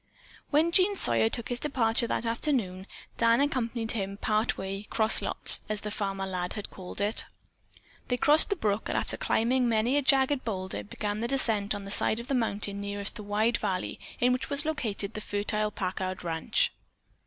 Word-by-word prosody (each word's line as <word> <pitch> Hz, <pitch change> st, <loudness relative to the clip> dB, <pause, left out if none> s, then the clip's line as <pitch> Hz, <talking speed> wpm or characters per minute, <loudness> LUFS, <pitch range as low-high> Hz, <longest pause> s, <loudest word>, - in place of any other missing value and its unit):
When 315 Hz, +3 st, +3 dB
Jean 385 Hz, +3 st, +4 dB
Sawyer 115 Hz, -, +4 dB
took 235 Hz, -, -4 dB
his 245 Hz, -1 st, -3 dB
departure 235 Hz, -5 st, +1 dB
that 235 Hz, -, -2 dB
afternoon, 230 Hz, -6 st, -1 dB, 0.3 s
Dan 230 Hz, 0 st, +4 dB
accompanied 240 Hz, -5 st, -1 dB
him 195 Hz, -3 st, -4 dB
part 215 Hz, +2 st, 0 dB
way 195 Hz, +1 st, -4 dB
"cross 220 Hz, -1 st, +3 dB
lots," -, -, +4 dB
as 210 Hz, -1 st, +1 dB
the 210 Hz, -, -5 dB
former 195 Hz, -2 st, -3 dB
lad 180 Hz, -1 st, -3 dB
had 210 Hz, -, -7 dB
called 185 Hz, -1 st, -9 dB
it. 205 Hz, +2 st, -1 dB, 0.8 s
They 250 Hz, -, 0 dB
crossed 300 Hz, -, +7 dB
the 400 Hz, -, +1 dB
brook 210 Hz, -, -1 dB
and -, -, -1 dB
after -, -, 0 dB
climbing 245 Hz, +2 st, +1 dB
many 230 Hz, +5 st, +2 dB
a -, -, +3 dB
jagged 270 Hz, 0 st, +3 dB
boulder, 185 Hz, -, -4 dB
began 205 Hz, -, -4 dB
the 235 Hz, -, -2 dB
descent 220 Hz, -6 st, +1 dB
on 200 Hz, -1 st, -7 dB
the 195 Hz, -, -7 dB
side 220 Hz, +2 st, +1 dB
of 235 Hz, -, -6 dB
the -, -, 0 dB
mountain 205 Hz, -4 st, -1 dB
nearest 200 Hz, 0 st, +1 dB
the 220 Hz, -, -7 dB
wide 215 Hz, +3 st, +1 dB
valley 190 Hz, -3 st, -3 dB, 0.2 s
in 250 Hz, +1 st, +3 dB
which 255 Hz, -, -3 dB
was 285 Hz, +1 st, +1 dB
located 220 Hz, -10 st, -3 dB
the 215 Hz, -, -5 dB
fertile 210 Hz, +1 st, -1 dB
Packard 185 Hz, -1 st, -4 dB
ranch. 165 Hz, -2 st, +1 dB
215 Hz, 190 wpm, -28 LUFS, 200-250 Hz, 0.8 s, crossed